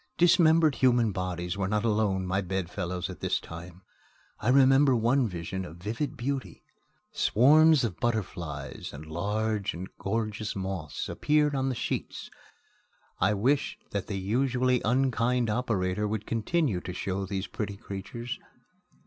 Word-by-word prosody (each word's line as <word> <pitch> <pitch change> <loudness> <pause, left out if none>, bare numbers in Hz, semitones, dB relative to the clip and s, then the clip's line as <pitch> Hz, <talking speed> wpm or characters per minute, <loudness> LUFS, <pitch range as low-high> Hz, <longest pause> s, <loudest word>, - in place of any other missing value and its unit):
Dismembered 165 -3 +5
human 120 -4 +3
bodies 90 -1 -3
were 95 -2 0
not 105 +2 0
alone 105 -4 +1
my 95 +2 0
bedfellows 90 -1 -3
at - - -8
this - - 0
time. 85 +2 -10 0.6
I 110 - 0
remember 135 +1 +6
one 120 +3 +2
vision 95 0 -4
of 85 -2 -9
vivid 115 +11 -3
beauty. 135 +2 -4 0.5
Swarms 150 +5 +5
of 105 -7 -2
butterflies 90 - -3
and 75 +2 -9
large 105 +5 -1
and 90 +2 -6
gorgeous 110 +1 -2
moths 95 -6 -4
appeared 150 -1 +2
on 135 -1 0
the 130 - -2
sheets. - - -4 0.9
I 105 - +3
wished 135 +8 0
that 100 -1 -3
the 100 - -3
usually 125 +5 +1
unkind 125 -1 +1
operator 105 -4 0
would 105 0 -3
continue 115 - 0
to 90 - -6
show 95 +1 -3
these 95 0 -3
pretty 100 +1 -5
creatures. 100 +5 -6
105 Hz, 140 wpm, -28 LUFS, 95-125 Hz, 0.9 s, remember